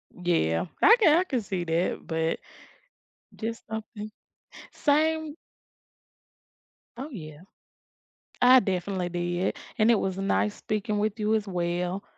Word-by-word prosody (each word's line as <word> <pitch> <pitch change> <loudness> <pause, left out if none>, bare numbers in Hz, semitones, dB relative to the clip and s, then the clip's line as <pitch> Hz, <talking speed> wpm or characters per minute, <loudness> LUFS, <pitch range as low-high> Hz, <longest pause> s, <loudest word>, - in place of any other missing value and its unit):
Yeah. 170 - +1 0.2
I 455 +4 +8
can 325 -6 +6
I 365 - +3
can 260 -10 -2
see 190 -3 -3
that, 165 +2 -1
but 160 0 -1 1.0
just 230 +1 -5
something 215 -1 -6 0.6
Same 315 +1 +1 1.6
Oh, 275 +4 -6
yeah. 155 - -9 1.0
I 255 +1 +8
definitely 185 -2 -2
did, 175 +1 -1 0.2
and 220 +1 +4
it 230 - +5
was 190 0 -2
nice 200 +1 0
speaking 210 0 -2
with 215 +1 -1
you 215 +1 +2
as 210 -2 -1
well. 180 +1 -2
205 Hz, 125 wpm, -27 LUFS, 175-235 Hz, 1.6 s, I